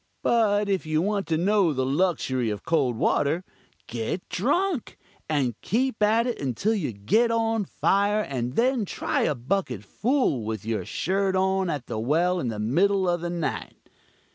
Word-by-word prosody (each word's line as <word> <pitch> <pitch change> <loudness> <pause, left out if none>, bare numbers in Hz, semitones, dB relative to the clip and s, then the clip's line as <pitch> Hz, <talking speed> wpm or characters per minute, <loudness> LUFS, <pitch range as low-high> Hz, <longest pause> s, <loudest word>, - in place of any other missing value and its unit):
But 210 -3 +2
if 195 -2 0
you 155 0 +1
want 200 +3 -1
to 160 - +1
know 190 -1 +2
the 130 -1 -1
luxury 135 -5 0
of 105 -2 -5
cold 140 -7 +1
water, 150 +9 +1 0.4
get 120 +10 -4
drunk, 295 - 0 0.3
and 140 -6 +1
keep 245 0 -1
at 220 +3 +3
it 245 - -3
until 140 - 0
you 180 - -1
get 110 - +2
on 225 -2 +1
fire, 205 +3 +1
and 125 - -3
then 250 -1 +2
try 195 - -2
a 150 - +1
bucket 125 - -2
full 225 - 0
with 110 -1 -4
your 110 -1 -2
shirt 190 +1 0
on 190 0 +1
at 145 -6 -3
the 110 - -4
well 170 +9 +1
in 130 - -2
the 110 -2 -3
middle 185 - +2
of 175 -1 0
the 175 - -3
night. 170 -2 -5
180 Hz, 170 wpm, -25 LUFS, 130-210 Hz, 0.4 s, at